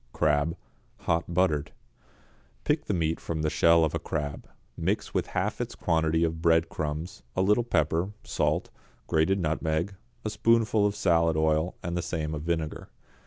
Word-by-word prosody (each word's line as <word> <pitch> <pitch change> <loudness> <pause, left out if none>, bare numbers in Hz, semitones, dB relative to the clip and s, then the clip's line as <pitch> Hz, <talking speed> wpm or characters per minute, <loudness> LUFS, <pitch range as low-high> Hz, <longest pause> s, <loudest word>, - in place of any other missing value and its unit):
=Crab, 75 +3 +1 0.4
Hot 85 +1 0
Buttered.= 85 -5 +1 0.9
Pick - - +1
the - - -1
meat 80 -1 0
from 80 -2 -3
the 75 - +1
shell 85 -1 +5
of 80 - -2
a - - -1
crab, 70 -1 -4 0.3
mix - - -1
with - - 0
half - - -2
its - - -4
quantity 80 0 +1
of 80 -1 -1
breadcrumbs, 80 -1 0
a 95 - +2
little 105 +5 +3
pepper, 85 -2 +1
salt, - - -1 0.3
grated 80 +5 +2
nutmeg, 80 +2 -1 0.3
a 110 - -1
spoonful 110 -2 +3
of 100 - -2
salad 85 -3 +2
oil 80 +2 +1
and 85 0 -3
the 90 - 0
same 80 -3 -3
of 75 - -4
vinegar. 80 -1 -3
80 Hz, 160 wpm, -28 LUFS, 80-85 Hz, 0.9 s, shell